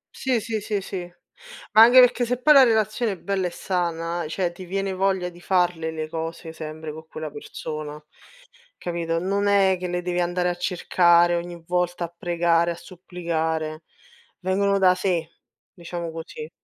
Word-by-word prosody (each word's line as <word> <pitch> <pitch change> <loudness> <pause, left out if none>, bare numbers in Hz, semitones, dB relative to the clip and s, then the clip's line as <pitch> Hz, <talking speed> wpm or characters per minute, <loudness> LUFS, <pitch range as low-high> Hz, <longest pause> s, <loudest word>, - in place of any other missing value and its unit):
Sì, 255 -3 0
sì, 220 -1 -3
sì, 210 0 -2
sì. 185 -2 -6 0.6
Anche 230 +4 +8
perché 250 0 +5
se 250 +1 -1
poi 300 +3 +6
la 275 - +9
relazione 220 -1 +1
è - - -9
bella 195 -2 -1
e - - -3
sana, 170 -2 -2
cioè 175 +2 -1
ti 175 +2 -10
viene 195 +1 -2
voglia 190 -1 0
di 175 0 -16
farle 175 -3 +1
le 155 -1 -4
cose 165 +1 -6
sempre 155 -1 -7
co' 160 +1 -10
quella 155 -1 -7
persona, 150 0 -7 0.8
capito? 170 -1 -2
Non 200 +3 0
è 195 -2 +4
che 180 - -3
le 180 0 -2
devi 180 0 -2
andare 175 0 0
a 175 - -2
cercare 175 -1 +3
ogni 170 0 -5
volta 180 0 0
a 170 - -12
pregare, 170 0 +1
a - - -4
supplicare, 165 -3 -4 0.6
vengono 195 +2 +1
da 185 -1 +5
sé, 180 -3 -1 0.5
diciamo 170 -1 -6
così. 180 - -8
175 Hz, 165 wpm, -24 LUFS, 165-195 Hz, 0.8 s, la